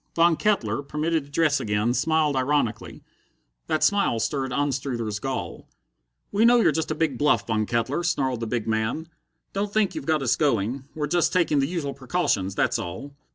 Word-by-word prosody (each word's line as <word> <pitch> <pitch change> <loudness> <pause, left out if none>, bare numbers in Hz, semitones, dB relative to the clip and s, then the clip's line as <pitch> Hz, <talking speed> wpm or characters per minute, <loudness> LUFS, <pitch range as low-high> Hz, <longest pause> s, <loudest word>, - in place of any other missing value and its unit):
Von 170 0 +4
Kettler, 145 - 0
permitted 150 +2 -1
to - - -18
dress 150 0 +2
again, 105 +3 0
smiled 155 0 +1
ironically. 130 -4 -1 0.6
That 155 -1 0
smile 200 - +2
stirred 130 +4 -1
Anstruther's 125 -6 -2
gall. 135 +4 -5 0.6
"We 205 +2 +2
know 240 +1 +6
you're - - +4
just 160 - -2
a 155 - -1
big 150 -5 -1
bluff, 150 0 +2
Von 110 -2 0
Kettler," 120 +7 0
snarled 135 -8 0
the 115 - -3
big 115 -1 -2
man. 110 +9 -1 0.4
"Don't 200 +1 -2
think 215 -2 +1
you've - - -6
got 155 -3 +1
us 120 - +2
going. 130 -2 0
We're 150 -1 -1
just 170 +3 +1
taking 170 -5 +2
the 135 - +1
usual 155 -5 -3
precautions, 130 - -1
that's - - +1
all." 115 +12 -6
140 Hz, 180 wpm, -25 LUFS, 120-160 Hz, 0.6 s, know